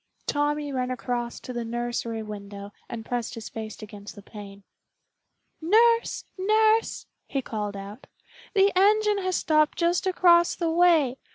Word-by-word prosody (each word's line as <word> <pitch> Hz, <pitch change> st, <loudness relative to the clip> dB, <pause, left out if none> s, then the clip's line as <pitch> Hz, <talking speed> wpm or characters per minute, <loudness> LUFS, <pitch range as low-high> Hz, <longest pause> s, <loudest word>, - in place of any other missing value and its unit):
Tommy 290 Hz, 0 st, -1 dB
ran 255 Hz, -1 st, -1 dB
across 240 Hz, -1 st, -3 dB
to 250 Hz, -, -7 dB
the 240 Hz, -1 st, -3 dB
nursery 235 Hz, -1 st, -3 dB
window 200 Hz, -1 st, -9 dB, 0.2 s
and 225 Hz, -2 st, -6 dB
pressed 240 Hz, -1 st, -3 dB
his 230 Hz, -, -7 dB
face 220 Hz, -1 st, -7 dB
against 205 Hz, -1 st, -10 dB
the 205 Hz, -, -12 dB
pane. 200 Hz, -1 st, -11 dB, 1.0 s
"Nurse, 460 Hz, +7 st, +3 dB
nurse!" 435 Hz, +3 st, +2 dB, 0.2 s
he 275 Hz, -2 st, -2 dB
called 210 Hz, -3 st, -4 dB
out. 200 Hz, +5 st, -10 dB, 0.5 s
"The 395 Hz, 0 st, +4 dB
engine 420 Hz, +2 st, +3 dB
has 370 Hz, -1 st, -1 dB
stopped 305 Hz, -1 st, +2 dB
just 345 Hz, +2 st, +1 dB
across 345 Hz, -2 st, +4 dB
the 335 Hz, -2 st, -1 dB
way. 325 Hz, -7 st, +3 dB
255 Hz, 145 wpm, -26 LUFS, 220-355 Hz, 1.0 s, The